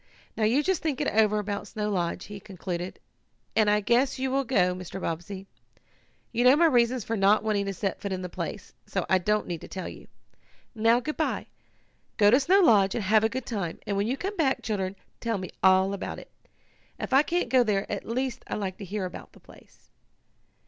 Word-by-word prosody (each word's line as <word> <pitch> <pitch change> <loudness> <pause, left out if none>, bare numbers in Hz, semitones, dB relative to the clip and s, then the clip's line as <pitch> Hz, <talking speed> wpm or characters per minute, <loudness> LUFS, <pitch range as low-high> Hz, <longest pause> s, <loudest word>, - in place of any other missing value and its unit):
Now 220 - +1
you 255 +7 +3
just 375 -1 0
think 305 -5 -1
it 295 - 0
over 215 -1 +3
about 205 0 -3
Snow 210 0 -3
Lodge," 175 -3 -2
he 205 0 -8
concluded, 180 -2 -6 0.6
"and 215 -1 +4
I 210 0 +3
guess 245 +6 +2
you 260 0 -1
will 275 +1 +1
go, 190 -8 +2
Mr. 185 +1 -7
Bobbsey. 185 +3 -5 0.9
You 240 - +1
know 255 +2 +7
my 335 +3 +4
reasons 245 -4 +3
for 225 - -2
not 205 +1 +4
wanting 205 -2 0
to 195 - -2
set 195 +1 -3
foot 200 - -4
in 185 -1 -3
the - - -3
place, 185 +3 -6
so 190 - -2
I 190 - +5
don't 210 +4 +1
need 170 -3 -5
to - - -9
tell 185 - -6
you. - - -10 0.7
"Now, 230 +1 +3
good 305 +4 -4
bye. 315 - -1 0.7
Go 205 -2 +6
to 255 - +6
Snow 375 +8 +4
Lodge, 205 - +5
and 230 - -1
have 215 +3 +4
a 220 - +3
good 260 +3 -4
time, 195 -9 -3
and 205 -2 -2
when 200 +2 0
you 260 +3 -1
come 395 +6 -4
back, 280 -7 +1
children, 195 -3 -2 0.2
tell 230 -2 -1
me 185 -1 -6
all 190 +1 +4
about 200 - -5
it. - - -12 0.7
If - - -4
I 270 - +7
can't 345 +3 -1
go 255 -2 +5
there 205 -3 0
at 200 - -4
least 255 +1 -3
I - - -3
like 190 -3 -3
to 200 - -6
hear 195 +1 -3
about 180 - -9
the - - -17
place." - - -20
210 Hz, 220 wpm, -27 LUFS, 195-250 Hz, 0.9 s, know